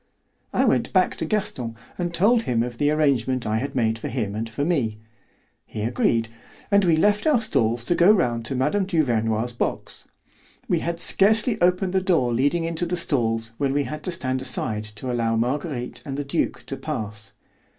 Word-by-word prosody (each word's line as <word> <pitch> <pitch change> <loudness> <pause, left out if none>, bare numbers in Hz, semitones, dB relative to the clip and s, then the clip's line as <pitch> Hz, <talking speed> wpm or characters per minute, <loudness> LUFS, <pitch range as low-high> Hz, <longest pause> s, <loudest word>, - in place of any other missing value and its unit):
I - - +2
went - - +1
back - - +3
to - - -2
Gaston 125 - -2 0.2
and 175 -1 -2
told 210 +8 +3
him 120 - 0
of 120 -1 -6
the 145 - +3
arrangement 135 -5 +1
I 110 +1 0
had 140 +2 -4
made 115 -2 +1
for - - -5
him 110 -5 -2
and 110 +2 -3
for 140 +6 -2
me. 130 -11 0 0.7
He 105 - -6
agreed, 115 0 +1 0.4
and 200 0 +5
we 170 -3 +4
left 205 - +2
our 295 -6 +4
stalls 120 - 0
to 145 - +1
go 175 +4 +6
round 120 - +1
to 135 - -2
Mme. 150 +10 +1
Duvernoy's 120 - 0
box. 120 - -4 0.6
We 175 - +1
had 170 +1 -3
scarcely 215 +5 +3
opened 180 +1 +2
the 190 - +2
door 165 -11 +2
leading 145 +8 +1
into 165 +1 -2
the 180 +1 -1
stalls 115 -8 0
when 140 -2 +1
we 145 0 +1
had 150 +2 -6
to 180 - -1
stand 130 -6 -2
aside 110 -4 -1
to 105 +4 -6
allow 115 -2 0
Marguerite 125 +2 -2
and 140 -2 -5
the 145 - -3
duke 140 - -1
to - - -5
pass. 105 0 -5
135 Hz, 190 wpm, -23 LUFS, 115-170 Hz, 0.7 s, go